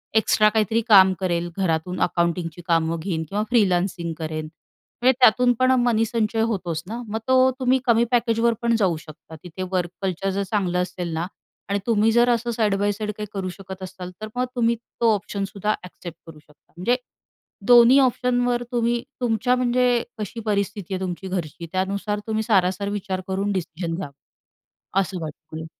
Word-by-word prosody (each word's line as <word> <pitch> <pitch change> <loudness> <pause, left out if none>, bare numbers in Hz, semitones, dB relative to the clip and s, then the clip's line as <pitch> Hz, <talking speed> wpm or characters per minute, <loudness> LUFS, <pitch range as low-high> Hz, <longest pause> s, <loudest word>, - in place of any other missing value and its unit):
Extra 215 -1 +4
काहीतरी 220 +1 +1
काम 190 -3 +7
करेल. 175 -2 -1
घरातून 180 0 -1
अकाउंटिंगची 170 -1 0
कामं 165 0 +1
घेईन 160 -2 -2
किंवा 210 +2 -1
फ्रीलान्सिंग 180 -6 +1
करेन. 155 -1 -4 0.6
म्हणजे 255 - +6
त्यातून 250 0 +5
पण 255 0 +4
मनीसंचय 225 -1 +1
होतोच 175 -6 -3
ना. 235 +3 -5
मग 220 +1 -3
तो 260 0 +5
तुम्ही 260 +1 +3
कमी 235 -1 +4
पॅकेजवर 235 -1 +2
पण 235 0 +2
जाऊ 180 -5 +2
शकता. 155 +1 -13
तिथे 180 +2 -6
वर्क 180 -2 0
कल्चर 190 0 -1
जर 200 +1 -1
चांगलं 180 -4 0
असेल 180 -2 -4
ना 165 +2 -1 0.4
आणि 200 0 0
तुम्ही 220 -1 +3
जर 240 +2 +4
असं 235 0 +1
साइड 215 -3 +1
बाय 205 0 +2
साइड 210 +1 -3
काही 210 0 -5
करू 190 -2 -3
शकत 190 0 -9
असताल. 185 -1 -8
तर 215 - -4
मग 250 +1 +1
तुम्ही 235 -1 +2
तो 230 -1 0
ऑप्शन 200 0 -3
सुद्धा 205 +2 -2
ॲक्सेप्ट 175 -2 -10
करू 155 -2 -12
शकता. 150 -1 -27
म्हणजे 235 +8 +2 0.7
दोन्ही 245 +2 +8
ऑप्शनवर 245 -1 +1
तुम्ही 235 0 0 0.2
तुमच्या 240 +1 +2
म्हणजे 250 -1 +2 0.2
कशी 215 +2 -5
परिस्थिती 200 -2 -2
आहे 185 - -3
तुमची 185 +1 -4
घरची, 170 -2 -4
त्यानुसार 200 +2 -1
तुम्ही 220 0 -1
सारासार 195 -1 +1
विचार 195 -2 -3
करून 195 +2 -1
डिसिजन 170 -2 -3
घ्या, 180 -5 -5 0.9
असं 185 -2 -3
वाटतंय. 155 +1 -8
200 Hz, 165 wpm, -23 LUFS, 180-230 Hz, 0.9 s, दोन्ही